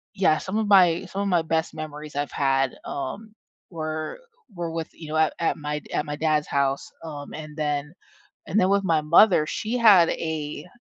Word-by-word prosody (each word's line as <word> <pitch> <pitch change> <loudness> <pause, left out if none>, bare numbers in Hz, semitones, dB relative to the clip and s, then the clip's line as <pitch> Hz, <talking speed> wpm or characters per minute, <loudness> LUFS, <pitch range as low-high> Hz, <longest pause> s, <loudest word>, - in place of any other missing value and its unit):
yeah, 180 -6 +3
some 195 +3 -4
of 220 -2 0
my 180 -4 +5
some 200 - -4
of 200 - -1
my 175 -3 +3
best 160 0 -1
memories 150 -1 -7
I've 145 0 -2
had, 135 -2 +1
um, 200 +11 -6 0.4
were 155 - -5
uh, - - -25 0.3
were 170 -1 -4
with, 165 -1 -4
you 160 - -11
know 155 - -1
at 160 0 +3
at 165 - +1
my 150 0 -3
d - - -17
at - - 0
my 150 - -4
dad's 155 -1 0
house, 140 -1 -1
um, 145 -3 -8
and 155 -1 -9
then 150 0 -2 0.5
and 205 - 0
then 185 - +3
with 200 0 +2
my 165 -3 +2
mother, 170 +1 +5
she 225 +8 -3
had 200 -7 +7
a 155 0 -4
155 Hz, 205 wpm, -24 LUFS, 150-180 Hz, 0.5 s, had